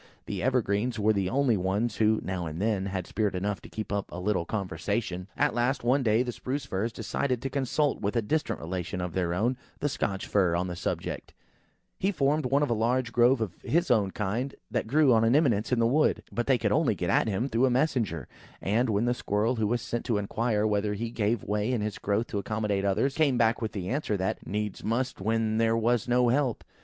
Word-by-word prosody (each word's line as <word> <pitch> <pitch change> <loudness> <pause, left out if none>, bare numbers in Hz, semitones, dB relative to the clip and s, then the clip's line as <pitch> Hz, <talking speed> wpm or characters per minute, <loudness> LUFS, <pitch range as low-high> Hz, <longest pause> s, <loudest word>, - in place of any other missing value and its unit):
The - - -4
evergreens 120 -2 +1
were 110 +1 +3
the 95 -3 0
only 130 -1 +2
ones 100 +5 -1
who, 110 0 +3
now 90 -3 -3
and 80 +2 -6
then, 100 -2 0
had 95 -2 -3
spirit 105 -1 -1
enough 100 0 -2
to - - -12
keep 110 -2 -5
up 100 -1 -2
a 85 - -6
little 95 -2 0
conversation. 95 0 -3
At - - +2
last, 120 +3 0
one 130 +4 +3
day, 115 0 +3
the 125 - -3
Spruce 135 +4 -4
firs 110 -1 -2
decided 125 +3 -2
to 135 - -3
consult 140 +1 0
with 105 +3 -1
a 115 - +2
distant 155 +8 -1
relation 90 +2 -4
of 90 -2 -3
their 90 -1 0
own, 120 +7 +1 0.2
the 145 - 0
Scotch 100 -8 -2
fir, 90 -4 +2
on 90 +1 0
the 90 -1 -4
subject. - - -4 0.6
He 195 - +1
formed 150 -3 +1
one 140 +3 +2
of 145 - 0
a - - +4
large 115 +2 0
grove 120 +1 +4
of 100 -6 -2
his 170 0 +1
own 105 -5 +3
kind, 110 +8 -2 0.2
that - - -1
grew 140 +1 +4
on 110 0 +4
an 115 +3 +4
eminence 120 -8 +2
in 125 - +3
the 115 - +3
wood. 145 +7 +2
But 120 - -2
they 135 -2 +4
could 105 -4 0
only 140 -4 +2
get 90 -2 -1
at - - +3
him 110 +5 0
through 130 0 +2
a - - +2
messenger; 120 - 0 0.3
and, 115 +5 +1
when 105 +2 +1
the 120 - +2
Squirrel 115 +1 0
who 110 -1 +1
was 120 +3 -1
sent 120 - -3
to 115 -4 +1
inquire 105 +1 0
whether 105 -1 0
he 115 +3 -3
ever - - -13
gave 110 0 0
way 105 +3 -1
in 120 -4 0
his 105 -1 -3
growth 105 +3 0
to 105 - -2
accommodate 105 -1 -1
others, 115 +8 +1
came 140 -4 +2
back 115 0 +2
with 110 - -3
the 95 -3 -4
answer 130 -6 -1
that, 95 0 -3
"Needs 105 0 -3
must 120 0 -1
when 110 +1 +1
there 115 0 +3
was 115 0 +1
no 125 0 +3
help!" 130 -1 +1
110 Hz, 235 wpm, -28 LUFS, 100-125 Hz, 0.6 s, a